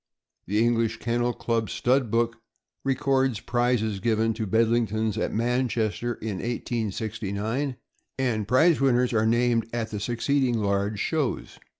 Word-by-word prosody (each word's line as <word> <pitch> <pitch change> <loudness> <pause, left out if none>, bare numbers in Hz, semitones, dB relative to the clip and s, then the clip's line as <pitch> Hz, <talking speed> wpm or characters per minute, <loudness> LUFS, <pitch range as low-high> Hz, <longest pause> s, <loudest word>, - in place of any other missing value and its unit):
The 105 +3 0
English 115 -1 +1
Kennel 120 +1 0
Club 115 -2 -1
Stud 125 -1 +1
Book 115 +1 +1 0.5
records 135 -3 +1
prizes 120 -4 0
given 110 +2 +1
to 110 -1 -4
Bedlingtons 110 0 +1
at 110 - -1
Manchester, 120 -1 0
in 105 -3 -4
1869, 110 +2 -3 0.4
and 115 -6 0
prize 155 +7 +4
winners 125 -2 +3
are 110 0 +2
named 120 -1 +2
at 115 -2 -3
the 105 - -3
succeeding 120 +3 0
large 100 0 0
shows. 155 -1 -2
115 Hz, 125 wpm, -26 LUFS, 110-125 Hz, 0.5 s, prize